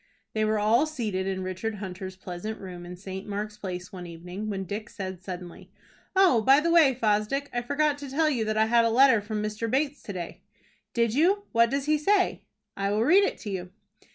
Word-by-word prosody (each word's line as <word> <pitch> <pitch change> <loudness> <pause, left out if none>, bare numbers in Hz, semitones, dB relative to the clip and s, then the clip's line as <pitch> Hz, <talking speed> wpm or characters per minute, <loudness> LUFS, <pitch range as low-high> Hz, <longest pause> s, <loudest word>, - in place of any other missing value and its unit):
They 215 - +1
were 215 0 +2
all 225 +8 +3
seated 215 -11 -2
in 190 -1 -2
Richard 185 +4 -3
Hunter's 190 -1 -6
pleasant 185 +4 -6
room 180 -2 -8
in 180 - -7
St. 190 +1 -7
Mark's 210 +1 -4
Place 180 -2 -6
one 180 -2 -7
evening, 180 +5 -7
when 195 -2 -3
Dick 210 +4 -5
said 190 -2 -6
suddenly: 180 0 -8 0.5
"Oh, 370 -12 +5
by 270 +6 +6
the 335 +2 +1
way, 310 -6 +6
Fosdick, 225 +5 0
I 240 - 0
forgot 290 +3 0
to 285 -1 -7
tell 310 +4 +2
you 255 -7 +1
that 215 0 -1
I 220 - +4
had 235 +1 +4
a 230 - +3
letter 250 -1 +5
from 210 0 -3
Mr. 215 +2 -3
Bates 280 +3 0
to 200 - -7
day." 175 -2 -6 0.5
"Did 235 -2 +2
you? 370 +9 +3
What 230 0 +4
does 275 +2 -1
he 305 0 +2
say?" 390 +5 +2 0.3
"I 195 0 -1
will 210 +2 +1
read 365 +10 +6
it - - -1
to 210 - -5
you." 185 -2 -4
215 Hz, 215 wpm, -27 LUFS, 190-270 Hz, 0.5 s, by